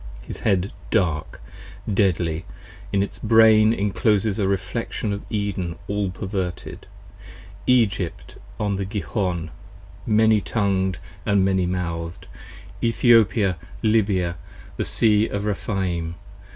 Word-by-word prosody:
His -, -, -7 dB
Head 95 Hz, -2 st, +1 dB, 0.2 s
dark, 85 Hz, -8 st, 0 dB, 0.5 s
deadly, 90 Hz, -5 st, +1 dB, 0.5 s
in 100 Hz, 0 st, +2 dB
its 100 Hz, -, -6 dB
Brain 110 Hz, -1 st, +6 dB
incloses 105 Hz, 0 st, +1 dB
a 100 Hz, -, +1 dB
reflexion 100 Hz, +3 st, -2 dB
15 -, -, 0 dB
Of 100 Hz, -, -6 dB
Eden 100 Hz, -5 st, -2 dB
all 100 Hz, -1 st, -1 dB
perverted: 95 Hz, 0 st, -5 dB, 0.8 s
Egypt 105 Hz, -8 st, +1 dB, 0.3 s
on 105 Hz, -2 st, 0 dB
the 100 Hz, -, -2 dB
Gihon, 95 Hz, -4 st, -2 dB, 0.6 s
many 110 Hz, -1 st, +4 dB
tongued 95 Hz, -4 st, 0 dB, 0.3 s
And 100 Hz, -2 st, +2 dB
many 95 Hz, -2 st, +1 dB
mouth'd: 85 Hz, -2 st, -4 dB, 0.6 s
Ethiopia, 115 Hz, -5 st, +4 dB, 0.3 s
Lybia, 100 Hz, -6 st, +2 dB, 0.4 s
the -, -, -2 dB
Sea 110 Hz, -1 st, +3 dB
of 100 Hz, 0 st, -3 dB
Rephaim. 90 Hz, -5 st, -2 dB
100 Hz, 110 wpm, -23 LUFS, 90-105 Hz, 0.8 s, Brain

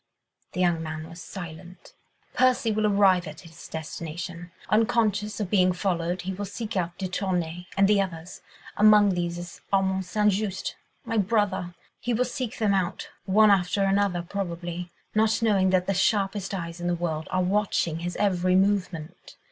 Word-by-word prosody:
The -, -, -4 dB
young 175 Hz, -2 st, +2 dB
man 155 Hz, 0 st, -5 dB
was 165 Hz, +1 st, -10 dB
silent. 175 Hz, 0 st, -9 dB, 0.4 s
"Percy 250 Hz, -3 st, +3 dB
will 215 Hz, 0 st, +1 dB
arrive 195 Hz, -4 st, +4 dB
at 155 Hz, 0 st, -9 dB
his 165 Hz, -2 st, -12 dB
destination: 170 Hz, +2 st, -6 dB, 0.2 s
unconscious 215 Hz, -1 st, +1 dB
of 200 Hz, -4 st, -3 dB
being 185 Hz, -3 st, +4 dB
followed 180 Hz, -1 st, -1 dB
he 190 Hz, +1 st, -3 dB
will 205 Hz, +2 st, -4 dB
seek 210 Hz, +3 st, -6 dB
out 175 Hz, -2 st, -2 dB
de 190 Hz, -, -3 dB
Tournay 180 Hz, -2 st, -2 dB
and 195 Hz, 0 st, +5 dB
the 205 Hz, -1 st, +4 dB
others—among 200 Hz, +4 st, +2 dB
these 175 Hz, -1 st, -2 dB
is 175 Hz, 0 st, -9 dB
Armand 190 Hz, -1 st, +1 dB
St. 210 Hz, +2 st, +2 dB
Just, 195 Hz, -1 st, -2 dB, 0.3 s
my 225 Hz, -1 st, 0 dB
brother—he 200 Hz, +2 st, -1 dB
will 250 Hz, +3 st, +2 dB
seek 250 Hz, -2 st, -4 dB
them 210 Hz, -3 st, +2 dB
out, 190 Hz, -1 st, -1 dB, 0.2 s
one 210 Hz, +2 st, +5 dB
after 195 Hz, 0 st, +2 dB
another, 195 Hz, -2 st, +1 dB
probably, 175 Hz, -1 st, -4 dB, 0.2 s
not 220 Hz, +1 st, +3 dB
knowing 200 Hz, -5 st, +3 dB
that 185 Hz, -1 st, +2 dB
the 195 Hz, -, 0 dB
sharpest 195 Hz, 0 st, +1 dB
eyes 170 Hz, -1 st, -6 dB
in 175 Hz, -, -2 dB
the 175 Hz, -, +1 dB
world 160 Hz, -2 st, -3 dB
are 185 Hz, 0 st, +1 dB
watching 185 Hz, -4 st, 0 dB
his 175 Hz, +1 st, -4 dB
every 185 Hz, -3 st, +2 dB
movement. 185 Hz, -4 st, -1 dB
185 Hz, 165 wpm, -26 LUFS, 175-205 Hz, 0.4 s, and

